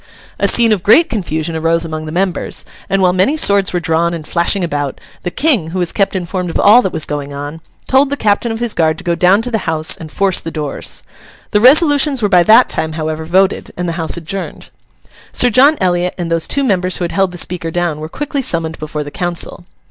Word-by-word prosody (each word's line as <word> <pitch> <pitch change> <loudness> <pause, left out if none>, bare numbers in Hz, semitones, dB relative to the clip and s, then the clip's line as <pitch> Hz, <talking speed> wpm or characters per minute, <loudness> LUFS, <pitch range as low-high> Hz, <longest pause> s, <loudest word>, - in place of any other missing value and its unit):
A - - +2
scene 230 -2 +3
of 205 -4 +1
great 310 - +4
confusion 165 -6 -3
arose 165 +1 0
among 155 -1 -6
the - - -6
members; 180 +1 -2 0.2
and 195 0 +1
while 180 -1 +3
many 190 +12 +1
swords 200 -8 +3
were 180 - -1
drawn 170 0 0
and 160 -2 -8
flashing 175 +4 +1
about, 145 -5 -3 0.2
the 180 - -3
King, 230 - +1
who 180 - -5
was 175 -2 -1
kept 195 -1 0
informed 180 0 -3
of - - -3
all 220 +5 +6
that 190 - -2
was 155 - -1
going 145 -1 -5
on, 145 +3 -7 0.3
told 270 +1 +3
the 285 - -2
captain 215 +1 0
of 225 - -3
his 235 -1 0
guard 160 -1 +1
to - - -7
go 170 - 0
down 185 +5 +3
to 245 - -2
the 220 -7 -2
House 160 -1 +1
and 155 -2 -10
force 195 -2 0
the 165 - -6
doors. 150 -3 -4 0.5
The 210 - +2
resolutions 285 -1 +4
were 205 - +2
by 180 -2 +5
that 225 +7 +6
time, 160 0 -3
however, 155 0 -4
voted, 190 +4 +1
and 180 0 -2
the 170 - -2
House 160 - -1
adjourned. 185 +4 -6 0.6
Sir 245 - +2
John 275 +6 +5
Eliot 180 -1 0
and 170 -2 -4
those 165 -1 0
two 280 - +1
members 185 -6 +1
who - - -3
had 170 - -2
held 195 0 +1
the 175 - -8
Speaker 170 -1 -3
down, 170 -2 -2
were 155 +1 -7
quickly 290 - -3
summoned 165 -8 -1
before 150 0 -4
the 145 - -9
council. 175 0 -3
180 Hz, 230 wpm, -15 LUFS, 160-210 Hz, 0.6 s, all